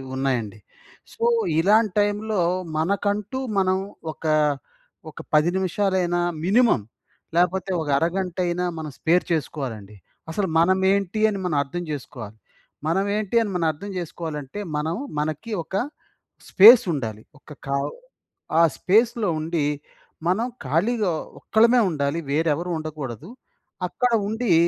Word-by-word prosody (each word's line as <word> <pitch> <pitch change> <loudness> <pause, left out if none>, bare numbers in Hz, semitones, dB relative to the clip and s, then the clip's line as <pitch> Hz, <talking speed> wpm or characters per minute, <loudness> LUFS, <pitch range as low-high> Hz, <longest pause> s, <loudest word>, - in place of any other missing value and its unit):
ఉన్నాయండి. 120 -6 -2 0.5
సో, 465 - -6 0.4
ఇలాంటి 210 +2 +3
టైమ్‌లో 205 -1 0 0.4
మనకంటూ 205 +7 -1 0.2
మనం 185 0 +2 0.4
ఒక, - - -14 0.9
ఒక - - -12 0.2
10 150 +3 +4
నిమిషాలైనా 185 -2 0 0.2
మినిమమ్ 215 - +3 0.5
లేకపోతే 185 +2 +1
ఒక 150 - -4
అరగంటైనా 180 +1 -1
మనం 155 -1 -5
స్పేర్ 175 +2 +2
చేసుకోవాలండి. 125 -10 -3 0.4
అసలు 190 +3 -1
మనమేంటి 190 +3 +2
అని 200 -2 -3
మనం 165 -5 0
అర్థం 175 +6 -5
చేసుకోవాలి. 125 -7 -7 0.5
మనమేంటి 200 +5 0
అని 215 - -1
మనం 170 -2 0
అర్థం 200 +7 -9
చేసుకోవాలంటే, 160 -1 -5 0.2
మనం 155 +3 -1 0.2
మనకి 155 +9 -3
ఒక - - -19 0.8
స్పేస్ 230 +5 +9
ఉండాలి. 110 -6 -4 0.2
ఒక 145 -2 -10 0.9
ఆ - - +7 0.2
స్పేస్‌లో 225 +2 +2
ఉండి 160 -1 -1 0.6
మనం 220 +7 +1 0.2
ఖాళీగా 190 - +1 0.3
ఒక్కలమే 235 +2 +4
ఉండాలి, 145 +1 -1
వేరే 160 +2 +2
ఎవరు 175 +2 -4
ఉండకూడదు. 155 - -6 0.6
అక్కడ 250 +6 0 0.2
ఉండి 220 -3 0
175 Hz, 110 wpm, -23 LUFS, 150-205 Hz, 0.9 s, స్పేస్